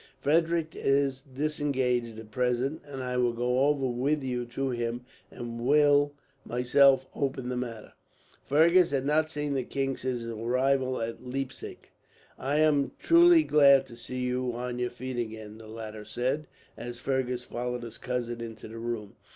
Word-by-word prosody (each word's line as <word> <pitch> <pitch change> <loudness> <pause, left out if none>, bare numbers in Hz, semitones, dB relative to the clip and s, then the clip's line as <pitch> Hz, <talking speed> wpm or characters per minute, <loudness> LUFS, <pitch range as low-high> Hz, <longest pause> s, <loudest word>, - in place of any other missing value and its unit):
Frederick 160 +3 +1
is 135 -1 +1
disengaged 130 -4 -1
at 110 -1 -11
present, 125 +5 0
and 135 -2 -6
I 125 0 -2
will 120 -1 +2
go 125 +3 +2
over 145 -2 +1
with 135 +4 0
you 125 -2 -2
to 135 +2 -2
him, 120 0 -3 0.2
and 120 -1 -7
will 145 +1 +4 0.3
myself 130 +2 +4
open 135 -3 -2
the 125 - -2
matter." 120 -3 -5 0.5
Fergus 170 +4 +5
had 135 -1 -1
not 155 +2 +2
seen 150 -2 -2
the 135 - 0
king 135 +1 -2
since 125 -2 -3
his 115 0 -5
arrival 130 +3 +1
at 115 +2 -4
Leipzig. 130 +1 -6 0.5
"I 140 +2 -1
am 145 -3 +3
truly 340 -1 +6
glad 140 - +6
to 120 - -12
see 125 +2 -6
you 125 0 -1
on 125 0 -4
your 125 0 0
feet 130 +1 -6
again," 110 -2 -5
the 110 - -12
latter 110 -1 -7
said, 130 +7 -2 0.3
as 120 0 -7
Fergus 125 -1 -1
followed 125 0 -4
his 115 - -9
cousin 120 -2 -3
into 115 -2 -7
the 115 +1 -8
room. 115 -3 -5
125 Hz, 165 wpm, -28 LUFS, 120-140 Hz, 0.5 s, truly